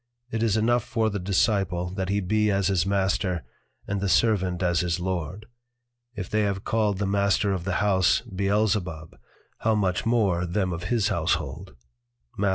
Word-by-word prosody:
_It 110 - -1
is 110 -2 +2
enough 120 +2 +2
for 115 -2 0
the 105 - -3
Disciple 90 -2 0
that 95 0 -3
he 100 +1 +1
be 105 +3 +1
as 100 -1 +1
his 95 -1 +1
Master, 95 -3 0 0.4
and 100 -1 -2
the 100 - 0
Servant 95 -5 +2
as 85 -1 +2
his 90 0 0
Lord: 90 +2 -3 0.7
If 95 -5 -5
they 110 - 0
have 100 -2 -1
called 105 -3 0
the 100 - -1
Master 100 0 +1
of 90 -2 -4
the 95 -2 -1
House 95 -3 +3
Beelzebub, 100 -5 -1 0.4
how 110 0 +2
much 95 -3 0
more 100 -7 +2
them 90 +1 -1
of 85 +1 -5
his 110 +1 +1
Household_, 85 - -2 0.6
_Matth. 100 - +1
100 Hz, 170 wpm, -25 LUFS, 90-105 Hz, 0.7 s, House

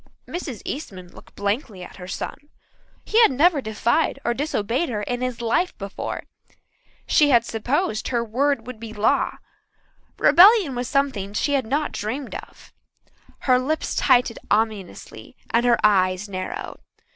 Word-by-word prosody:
Mrs. 295 - -6
Eastman 190 - -6
looked - - -16
blankly 205 -2 -3
at - - -12
her 180 -1 -9
son. 285 +9 -6 0.6
He 450 - +3
had 455 - +7
never 295 +3 +3
defied 235 +8 0
or 240 - +2
disobeyed 260 +2 -1
her 210 -3 -3
in 245 +3 -3
his 255 -2 -3
life 235 +10 0
before. 200 -1 -5 0.8
She 295 -1 +4
had 235 -3 +4
supposed 240 - -1
her 235 -2 0
word 250 +2 0
would 250 -3 -8
be 225 -1 -8
law. 215 +1 +1 0.8
Rebellion 385 - +6
was 245 0 -3
something 260 -8 -1
she 285 +7 0
had 265 -5 0
not 290 +5 -1
dreamed 255 +6 -4
of. - - -10 0.7
Her 255 -2 +3
lips 305 +5 -2
tightened 250 -3 +2
ominously 215 -3 -2
and 235 +1 +2
her 240 - +4
eyes 190 -1 +3
narrowed. 185 -2 -6
240 Hz, 145 wpm, -23 LUFS, 210-280 Hz, 0.8 s, had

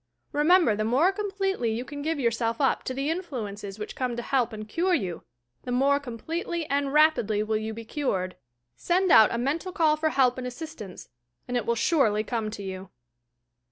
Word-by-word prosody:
Remember 305 - +4
the 215 - -1
more 265 - +3
completely 390 - -1
you 235 +3 -3
can 285 +2 -7
give 315 +1 -1
yourself 230 -2 0
up 270 -2 +2
to 260 - -2
the 275 +3 -1
influences 215 - -5
which 210 - -6
come 250 -2 -2
to 240 - -4
help 250 -3 +1
and 215 -1 -7
cure 355 - +1
you, 185 - -3 0.4
the 245 - -6
more 275 +3 +3
completely 320 +6 -4
and 280 -1 +1
rapidly 285 -9 +3
will 215 0 -1
you 220 +1 -4
be 225 +1 -8
cured. 190 -9 -2 0.4
Send 360 - +1
out 220 -1 +8
a - - -1
mental 295 +9 -1
call 320 -5 +3
for 315 0 +1
help 255 -4 +2
and 250 - -4
assistance, 245 - -8 0.4
and 245 - -3
it 245 - -1
will 235 - +2
surely 225 - +2
come 225 -1 -2
to 210 -1 -7
you 190 -1 -6
250 Hz, 190 wpm, -26 LUFS, 220-310 Hz, 0.4 s, out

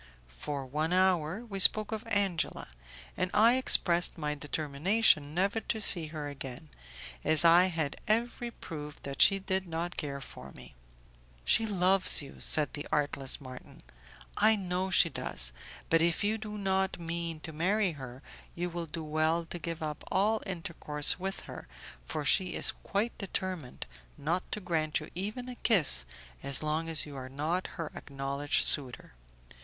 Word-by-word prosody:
For 135 - -6
one 155 +6 -2
hour 185 +2 +1
we 200 -4 -6
spoke 215 +3 +6
of 220 +1 -5
Angela, 200 - -1 0.5
and 185 - -1
I 230 +4 +6
expressed 175 -9 +4
my 150 -2 -2
determination 150 +3 +1
never 195 +5 +1
to 220 - -3
see 175 -6 +5
her 150 -1 -6
again, 130 - -8 0.5
as 155 +1 +2
I 170 +2 +7
had 165 -6 -2
every 235 +2 0
proof 150 -9 -9
that 140 -1 -3
she 195 - +7
did 190 -1 -2
not 170 +2 -4
care 140 -2 -4
for 70 - -11
me. 65 -1 -13 0.7
"She 225 - +4
loves 190 -1 +2
you," 140 -2 -9
said 150 -1 +2
the 145 - -6
artless 145 -3 -1
Marton; 130 -3 -12 0.5
"I 220 +1 +5
know 185 -1 -2
she 180 - +5
does, - - -1 0.3
but 165 0 +3
if 170 +2 +1
you 215 +2 0
do 210 -1 -7
not 190 -2 -1
mean 170 -1 -4
to 160 - -7
marry 190 +5 +1
her, 130 -3 -10 0.3
you 175 +1 -3
will 170 0 -5
do 160 +1 -6
well 155 +2 0
to 175 - -7
give 165 0 -5
up 150 -1 -5
all 210 +3 +1
intercourse 165 -4 -2
with 195 +1 -4
her, - - -10 0.4
for 150 - -4
she 185 +4 +2
is - - +4
quite 210 +4 -2
determined 185 -8 -5 0.3
not 170 +5 -2
to - - -2
grant 160 -5 -1
you 155 - -10
even 210 +8 -5
a 250 - -6
kiss 165 - +1 0.4
as 140 +2 0
long 155 +2 -1
as 160 -2 0
you 145 -2 -10
are 130 -1 -7
not 155 +7 -2
her 165 -3 -5
acknowledged 140 +1 -2
suitor. 130 - +6
165 Hz, 165 wpm, -30 LUFS, 150-190 Hz, 0.7 s, I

